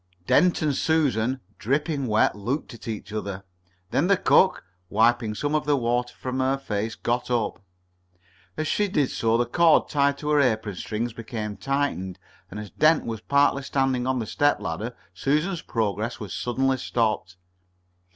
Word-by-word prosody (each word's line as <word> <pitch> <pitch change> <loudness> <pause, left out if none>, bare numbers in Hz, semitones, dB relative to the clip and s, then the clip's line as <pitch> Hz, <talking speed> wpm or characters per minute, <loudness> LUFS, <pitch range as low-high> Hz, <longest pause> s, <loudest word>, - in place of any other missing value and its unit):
Dent 175 - +3
and 150 -3 +1
Susan, 130 -6 +1 0.2
dripping 140 +2 0
wet, 110 -1 +3
looked 120 +8 -3
at 115 - -12
each 110 -1 -5
other. 100 -3 -4 0.5
Then 160 - +2
the 200 -1 +4
cook, 190 - +3 0.2
wiping 110 +1 +2
some 145 +6 -2
of 155 -1 +1
the 145 -1 +2
water 125 0 -1
from 130 0 -4
her 130 +1 +1
face, 110 -3 -3
got 120 +1 -2
up. 115 -6 -1 1.0
As 155 0 -1
she 210 - +1
did 145 -8 +1
so 115 0 +1
the 120 - +2
cord 165 +6 +4
tied 140 -1 +2
to 150 - -4
her 150 -1 +4
apron 110 -5 +1
strings 110 +5 -3
became 110 -2 -5
tightened, 135 -8 -2 0.3
and 105 - -7
as 105 -2 -8
Dent 155 +1 +3
was 110 -2 -4
partly 140 +1 +3
standing 135 -2 0
on 130 0 +1
the 115 - -2
step 145 +6 +2
ladder, 110 +9 -4 0.2
Susan's 160 +5 0
progress 110 +1 -2
was 105 -4 -6
suddenly 130 +2 0
stopped. 110 -7 -1
125 Hz, 165 wpm, -25 LUFS, 110-145 Hz, 1.0 s, the